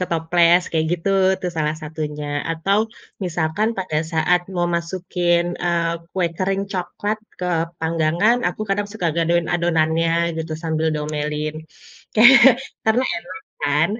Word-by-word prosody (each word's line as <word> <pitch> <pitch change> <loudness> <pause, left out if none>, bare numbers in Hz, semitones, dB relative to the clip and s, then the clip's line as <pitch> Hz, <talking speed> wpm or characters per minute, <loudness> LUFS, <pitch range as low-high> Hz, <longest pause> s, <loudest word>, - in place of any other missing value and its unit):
ke 180 - -1
toples 170 +1 +3
kayak 160 -1 +1
gitu, 175 +2 -2 0.3
itu 185 - -5
salah 155 0 0
satunya 150 -1 -5 0.2
atau 185 +5 +1 0.5
misalkan 170 +5 0
pada 180 -5 -2 0.2
saat 175 +3 +3
mau 175 0 +1
masukin, 175 0 0 0.2
eee, 170 -1 +1 0.2
kue 185 -2 +1
kering 195 +1 0
coklat 205 +3 -3 0.2
ke 180 - -3 0.3
panggangan, 165 +7 +2
aku 180 - -8
kadang 205 +1 0
suka 185 -6 -2
gadoin 170 0 +1
adonannya 165 -1 +1 0.3
gitu, 160 0 -4
sambil 160 -1 -1
diomelin. 150 0 -3 0.6
Ke - - +4 0.7
karena 240 +4 +3
enak 185 +1 -8 0.2
kan. 150 +3 +2
170 Hz, 135 wpm, -21 LUFS, 160-180 Hz, 0.7 s, Ke